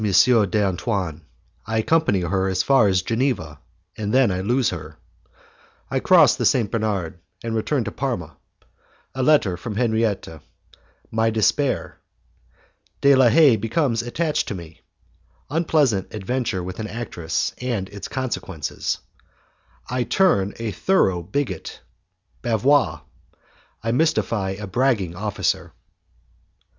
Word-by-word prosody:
d'Antoine 100 Hz, -4 st, +2 dB, 0.5 s
I 110 Hz, 0 st, -1 dB
Accompany 110 Hz, -, +2 dB
Her 95 Hz, +2 st, 0 dB
as 95 Hz, 0 st, 0 dB
Far 135 Hz, -6 st, +4 dB
as 95 Hz, -1 st, +2 dB
Geneva 115 Hz, -, -1 dB, 0.4 s
and 105 Hz, -1 st, -3 dB
Then 130 Hz, -4 st, +4 dB
I 90 Hz, 0 st, -2 dB
Lose 120 Hz, +4 st, +1 dB
Her 80 Hz, -3 st, -8 dB, 0.9 s
I -, -, +1 dB
Cross -, -, +5 dB
the -, -, -1 dB
St. 115 Hz, -6 st, +1 dB
Bernard, 100 Hz, -7 st, -2 dB, 0.2 s
and 115 Hz, -1 st, -3 dB
Return 120 Hz, +4 st, 0 dB
to 105 Hz, -, -5 dB
Parma 90 Hz, -, -4 dB, 0.8 s
A 130 Hz, -, -3 dB
Letter 125 Hz, -11 st, +3 dB
from 105 Hz, +4 st, -6 dB
Henriette 110 Hz, -3 st, 0 dB, 0.8 s
My 110 Hz, 0 st, +2 dB
Despair 110 Hz, +5 st, 0 dB, 1.0 s
De 140 Hz, 0 st, +6 dB
La 130 Hz, -2 st, +6 dB
Haye 145 Hz, -5 st, +6 dB
Becomes 115 Hz, +2 st, 0 dB
Attached 150 Hz, +5 st, -1 dB
to 100 Hz, -, -3 dB
Me 85 Hz, -2 st, -11 dB, 0.7 s
Unpleasant 150 Hz, -, +1 dB
Adventure 110 Hz, -2 st, -2 dB
with 90 Hz, +3 st, -7 dB
an 110 Hz, -, -3 dB
Actress 105 Hz, -8 st, -3 dB
and 120 Hz, -7 st, -2 dB
Its 100 Hz, -1 st, -7 dB
Consequences 110 Hz, -, -3 dB, 0.9 s
I 125 Hz, 0 st, -1 dB
Turn 120 Hz, -, +2 dB
a 115 Hz, -2 st, -3 dB
Thorough 95 Hz, -, +1 dB
Bigot 130 Hz, -, -4 dB, 0.6 s
Bavois 125 Hz, +5 st, +2 dB, 0.8 s
I 115 Hz, -, 0 dB
Mystify 115 Hz, -9 st, 0 dB
a 105 Hz, -, -5 dB
Bragging 100 Hz, -4 st, 0 dB
Officer. 105 Hz, +1 st, -2 dB
110 Hz, 120 wpm, -22 LUFS, 95-130 Hz, 1.0 s, De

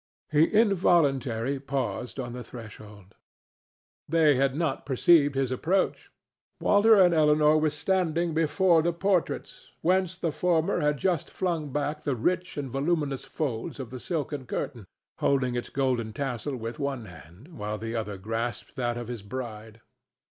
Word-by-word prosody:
He 155 Hz, +1 st, +5 dB
involuntarily 140 Hz, -, +2 dB
paused 130 Hz, -4 st, -3 dB
on 120 Hz, -2 st, -4 dB
the 125 Hz, 0 st, -6 dB
threshold. 105 Hz, -5 st, -12 dB, 1.0 s
They 160 Hz, -2 st, +5 dB
had 135 Hz, 0 st, +1 dB
not 165 Hz, +1 st, -1 dB
perceived 145 Hz, +1 st, +4 dB
his 135 Hz, -2 st, 0 dB
approach. 180 Hz, +9 st, 0 dB, 0.5 s
Walter 220 Hz, +2 st, +5 dB
and 180 Hz, -2 st, +6 dB
Elinor 150 Hz, -1 st, +4 dB
were 155 Hz, 0 st, +2 dB
standing 170 Hz, 0 st, 0 dB
before 165 Hz, +2 st, +3 dB
the 170 Hz, +2 st, 0 dB
portraits, 185 Hz, 0 st, -1 dB
whence 185 Hz, +1 st, +1 dB
the 170 Hz, -3 st, -1 dB
former 165 Hz, 0 st, +1 dB
had 150 Hz, 0 st, +1 dB
just 175 Hz, -1 st, 0 dB
flung 165 Hz, -6 st, -2 dB
back 150 Hz, +2 st, -2 dB
the 145 Hz, -3 st, -1 dB
rich 180 Hz, +10 st, -1 dB
and 140 Hz, -3 st, -4 dB
voluminous 140 Hz, -1 st, -1 dB
folds 130 Hz, -4 st, -4 dB
of 125 Hz, -3 st, -6 dB
the 130 Hz, -, -6 dB
silken 145 Hz, -4 st, -3 dB
curtain, 110 Hz, -6 st, -4 dB, 0.3 s
holding 130 Hz, -3 st, +1 dB
its 120 Hz, 0 st, -3 dB
golden 125 Hz, -5 st, -1 dB
tassel 135 Hz, +1 st, -3 dB
with 115 Hz, +2 st, -6 dB
one 140 Hz, -5 st, -3 dB
hand, 90 Hz, -, -14 dB
while 105 Hz, -9 st, -5 dB
the 115 Hz, +2 st, -5 dB
other 105 Hz, -3 st, -3 dB
grasped 115 Hz, +6 st, -4 dB
that 120 Hz, -2 st, -1 dB
of 120 Hz, -1 st, -5 dB
his 120 Hz, -3 st, -5 dB
bride. 110 Hz, -1 st, -7 dB
140 Hz, 150 wpm, -27 LUFS, 120-165 Hz, 1.0 s, and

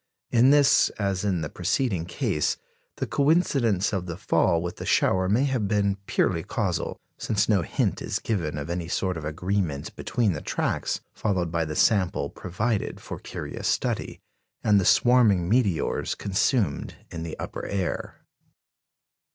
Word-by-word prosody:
In 120 Hz, +2 st, +5 dB
this, 145 Hz, -2 st, +5 dB
as 100 Hz, -2 st, -1 dB
in 95 Hz, -5 st, 0 dB
the 75 Hz, -, -2 dB
preceding 95 Hz, -2 st, -1 dB
case, 75 Hz, -4 st, 0 dB, 0.4 s
the -, -, -2 dB
coincidence 135 Hz, -, +2 dB
of 95 Hz, -2 st, -2 dB
the 85 Hz, -1 st, -5 dB
fall 95 Hz, -4 st, +2 dB
with 85 Hz, +1 st, -5 dB
the -, -, -6 dB
shower 95 Hz, 0 st, +2 dB
may 115 Hz, +7 st, +3 dB
have 130 Hz, -7 st, 0 dB
been 100 Hz, -1 st, +1 dB
purely -, -, +1 dB
casual, -, -, -2 dB, 0.2 s
since 105 Hz, -, 0 dB
no 105 Hz, -4 st, +3 dB
hint -, -, -1 dB
is -, -, -2 dB
given 85 Hz, -9 st, -2 dB
of 75 Hz, 0 st, -4 dB
any 85 Hz, 0 st, -3 dB
sort 95 Hz, +1 st, -1 dB
of 80 Hz, -, -6 dB
agreement 80 Hz, -1 st, -2 dB
between 110 Hz, -6 st, 0 dB
the 75 Hz, -, -5 dB
tracks -, -, -1 dB
followed 90 Hz, -6 st, -1 dB
by 85 Hz, -1 st, 0 dB
the 75 Hz, 0 st, -5 dB
sample 100 Hz, -3 st, +2 dB
provided 105 Hz, +4 st, -2 dB
for -, -, -7 dB
curious -, -, -5 dB
study, -, -, -1 dB, 0.4 s
and 105 Hz, -1 st, +5 dB
the -, -, -2 dB
swarming 110 Hz, -8 st, +4 dB
meteors 105 Hz, -6 st, +1 dB
consumed 100 Hz, -, 0 dB, 0.2 s
in 85 Hz, -, -5 dB
the 80 Hz, -1 st, -5 dB
upper -, -, -5 dB
air. 95 Hz, -4 st, -3 dB
95 Hz, 155 wpm, -26 LUFS, 85-110 Hz, 0.4 s, In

